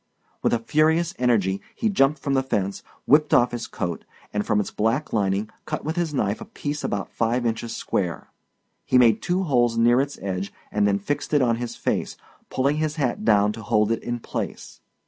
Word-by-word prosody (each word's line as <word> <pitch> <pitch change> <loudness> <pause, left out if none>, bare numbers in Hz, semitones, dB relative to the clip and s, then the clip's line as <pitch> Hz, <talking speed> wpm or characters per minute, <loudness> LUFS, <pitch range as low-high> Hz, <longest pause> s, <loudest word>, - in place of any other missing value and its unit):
With - - +2
a 120 - +3
furious 155 +8 +2
energy 100 -6 +2
he 225 - 0
jumped 150 -8 +3
from 140 0 -2
the 135 - +3
fence, 100 -7 -2 0.2
whipped 150 +2 +5
off 125 +1 +4
his 120 -1 -4
coat, 85 -2 -4 0.3
and 105 0 0
from 105 - +1
its 105 - -2
black 115 +8 0
lining 100 0 0
cut - - -4
with 160 +2 -2
his 175 -3 -1
knife 105 -7 -1
a - - -6
piece 145 0 -5
about 100 -1 -2
five 120 +2 0
inches 115 0 -2
square. 90 -4 -2 0.5
He 130 - +3
made 115 -3 +5
two 180 +2 0
holes 120 -7 +2
near 120 +2 +5
its 140 +1 -4
edge 95 0 -3 0.2
and 105 0 +2
then 100 -1 +2
fixed 145 +9 -2
it 145 - +4
on 115 -2 +2
his 120 0 -5
face, - - -2 0.3
pulling 140 +3 +1
his 155 -1 -1
hat 130 -8 -1
down 105 -1 +4
to 115 - -8
hold 105 -1 +2
it 115 - 0
in 120 0 -3
place. - - -6
120 Hz, 205 wpm, -24 LUFS, 105-145 Hz, 0.5 s, whipped